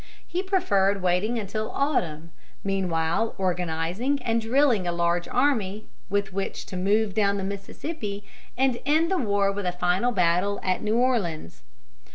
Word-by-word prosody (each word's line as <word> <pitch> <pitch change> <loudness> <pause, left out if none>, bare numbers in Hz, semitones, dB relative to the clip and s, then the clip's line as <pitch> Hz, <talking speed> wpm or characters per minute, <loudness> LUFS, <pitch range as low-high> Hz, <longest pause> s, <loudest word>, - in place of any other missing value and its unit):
He 355 - -1
preferred 200 - +1
waiting 185 +6 +1
until 215 0 -3
autumn, 170 - -1 0.3
meanwhile 185 +1 0
organizing 180 - -1
and 230 0 +1
drilling 235 -4 +2
a - - +1
large 170 0 0
army, 220 -7 +1 0.2
with 200 -1 -1
which 195 0 -3
to - - -8
move 200 +3 +1
down 200 -1 +2
the 195 - -3
Mississippi 200 - -5 0.3
and 260 -2 +2
end 315 +5 +2
the 375 - +2
war 200 -4 +2
with 200 -2 -3
a - - +1
final 180 +6 +1
battle 180 0 +2
at 185 -1 0
New 215 +1 +1
Orleans. 175 - 0
200 Hz, 150 wpm, -26 LUFS, 180-235 Hz, 0.3 s, drilling